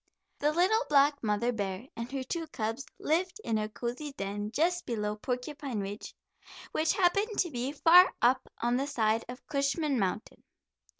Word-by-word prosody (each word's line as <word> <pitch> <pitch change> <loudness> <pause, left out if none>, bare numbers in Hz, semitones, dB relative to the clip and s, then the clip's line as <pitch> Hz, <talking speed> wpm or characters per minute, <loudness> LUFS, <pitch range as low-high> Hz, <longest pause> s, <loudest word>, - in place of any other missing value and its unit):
The 295 +1 +2
little 375 +8 +3
black 285 0 +4
mother 215 +2 +1
bear 200 0 -4
and 230 +2 -6
her 270 -1 -3
two 330 +5 -4
cubs 225 0 -4
lived 360 +6 0
in 220 -1 0
a 215 0 -2
cozy 250 +6 -5
den 205 -1 -4
just 350 +8 +1
below 210 -3 -2
Porcupine 250 +2 -4
Ridge, 200 +1 -6 0.6
which 315 - +1
happened 400 +3 +2
to 350 -4 +1
be 250 +1 -2
far 345 +5 +7
up 255 +2 +2
on 240 +1 +2
the 275 +2 -1
side 225 -5 +1
of 250 +1 -9
Cushman 280 -1 0
Mountain. 195 +2 -3
260 Hz, 165 wpm, -30 LUFS, 220-310 Hz, 0.6 s, far